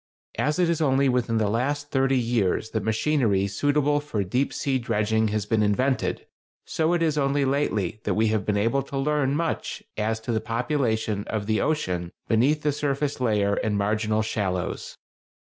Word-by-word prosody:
As 150 Hz, +3 st, +1 dB
it 180 Hz, -1 st, +3 dB
is 165 Hz, -1 st, 0 dB
only 135 Hz, -2 st, +3 dB
within 125 Hz, -2 st, +1 dB
the 110 Hz, -1 st, +1 dB
last 145 Hz, +7 st, -1 dB
thirty 135 Hz, 0 st, +2 dB
years 115 Hz, -3 st, 0 dB
that 110 Hz, -, -1 dB
machinery 110 Hz, -3 st, +1 dB
suitable 145 Hz, +8 st, +1 dB
for 145 Hz, -9 st, -2 dB
deep 125 Hz, +9 st, 0 dB
sea 135 Hz, -3 st, -1 dB
dredging 110 Hz, -1 st, +1 dB
has 105 Hz, -1 st, -1 dB
been 110 Hz, 0 st, +1 dB
invented, 125 Hz, +6 st, 0 dB, 0.4 s
so 160 Hz, +2 st, 0 dB
it 170 Hz, -1 st, +1 dB
is 155 Hz, -2 st, +1 dB
only 140 Hz, 0 st, +1 dB
lately 110 Hz, -8 st, -1 dB
that -, -, 0 dB
we 110 Hz, 0 st, +2 dB
have 110 Hz, -2 st, 0 dB
been 105 Hz, -1 st, 0 dB
able 115 Hz, +6 st, +1 dB
to 135 Hz, 0 st, -6 dB
learn 140 Hz, 0 st, +1 dB
much 165 Hz, +1 st, -2 dB
as 110 Hz, +1 st, -1 dB
to 115 Hz, -, -3 dB
the 110 Hz, -1 st, 0 dB
population 115 Hz, -3 st, -1 dB
of 110 Hz, -2 st, -3 dB
the 110 Hz, +1 st, +1 dB
ocean 90 Hz, -, -1 dB, 0.2 s
beneath 135 Hz, +7 st, +2 dB
the 150 Hz, -, +2 dB
surface 145 Hz, -1 st, -2 dB
layer 105 Hz, -4 st, +2 dB
and 105 Hz, 0 st, 0 dB
marginal 110 Hz, +1 st, 0 dB
shallows. 95 Hz, -5 st, -3 dB
115 Hz, 180 wpm, -25 LUFS, 105-145 Hz, 0.4 s, it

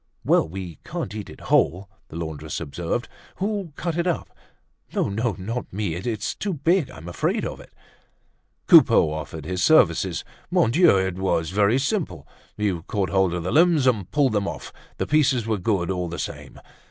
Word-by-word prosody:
"Well! -, -, +3 dB
We 90 Hz, -3 st, -7 dB
can't 95 Hz, -, -5 dB
eat 105 Hz, -1 st, -6 dB
it -, -, -12 dB
whole," 95 Hz, +4 st, +2 dB, 0.2 s
the -, -, -12 dB
laundress 80 Hz, -3 st, -5 dB
observed. 85 Hz, -, -3 dB, 0.3 s
"Who'll 200 Hz, -3 st, -2 dB
cut 170 Hz, -2 st, -3 dB
it 170 Hz, -, 0 dB
up? 175 Hz, -, -2 dB, 0.6 s
No, -, -, +1 dB
no, 110 Hz, +3 st, -1 dB
not 115 Hz, +6 st, -5 dB
me! 100 Hz, -3 st, -2 dB
It's 110 Hz, +4 st, -3 dB
too 200 Hz, -4 st, -3 dB
big; 165 Hz, 0 st, +2 dB
I'm 85 Hz, -9 st, -11 dB
afraid 85 Hz, -, -1 dB
of -, -, -5 dB
it." -, -, -15 dB, 0.9 s
Coupeau 75 Hz, -, +6 dB
offered 80 Hz, -1 st, -6 dB
his 90 Hz, +2 st, -3 dB
services. -, -, +3 dB, 0.3 s
Mon 115 Hz, -, +3 dB
Dieu! 165 Hz, -, +5 dB
it 95 Hz, -1 st, -1 dB
was 85 Hz, -4 st, 0 dB
very 105 Hz, +4 st, +3 dB
simple. 135 Hz, -, -2 dB, 0.3 s
You 100 Hz, -5 st, -1 dB
caught 100 Hz, -3 st, -1 dB
hold 95 Hz, -3 st, +2 dB
of 85 Hz, -, -3 dB
the 90 Hz, -, -2 dB
limbs, 165 Hz, -3 st, +4 dB
and 110 Hz, -8 st, +1 dB
pulled 145 Hz, -4 st, +2 dB
them 100 Hz, -1 st, 0 dB
off; -, -, -6 dB, 0.2 s
the -, -, -1 dB
pieces 135 Hz, -6 st, +2 dB
were 110 Hz, -2 st, -1 dB
good 95 Hz, -2 st, 0 dB
all 90 Hz, -1 st, -2 dB
the 85 Hz, +1 st, -6 dB
same. -, -, -6 dB
100 Hz, 180 wpm, -24 LUFS, 90-130 Hz, 0.9 s, Coupeau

